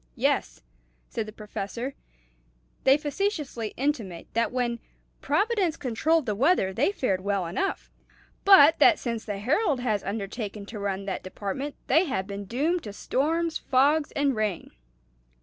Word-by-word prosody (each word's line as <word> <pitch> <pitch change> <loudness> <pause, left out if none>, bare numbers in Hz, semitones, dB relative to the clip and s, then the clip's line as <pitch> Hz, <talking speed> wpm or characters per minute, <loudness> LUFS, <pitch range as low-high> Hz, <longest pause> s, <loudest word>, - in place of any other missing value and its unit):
"Yes," - - 0 0.5
said 220 -2 -3
the - - -7
Professor; 215 +4 -5 0.9
"they 270 +1 +6
facetiously 295 - -3
intimate 230 - -2
that 230 +1 +1
when 240 -2 -1 0.4
Providence 400 -7 +1
controlled 295 +5 +1
the 215 - 0
weather 230 - +2
they 265 - +2
fared 200 - -1
well 200 -2 -1
enough; 285 - -3 0.5
but 330 -5 +8
that 340 -4 +7
since 230 -3 -3
the 205 -2 -3
Herald 280 - +1
has 215 -5 0
undertaken 205 0 -4
to 210 +1 -8
run 200 -1 -3
that 195 - -3
department 205 +10 -5
they 330 +4 +4
have 260 - -2
been 200 0 -6
doomed 305 - 0
to 205 - -6
storms, 320 +9 0
fogs, 290 +4 +2
and 280 -2 +1
rain. 215 -5 -2
245 Hz, 145 wpm, -26 LUFS, 205-300 Hz, 0.9 s, but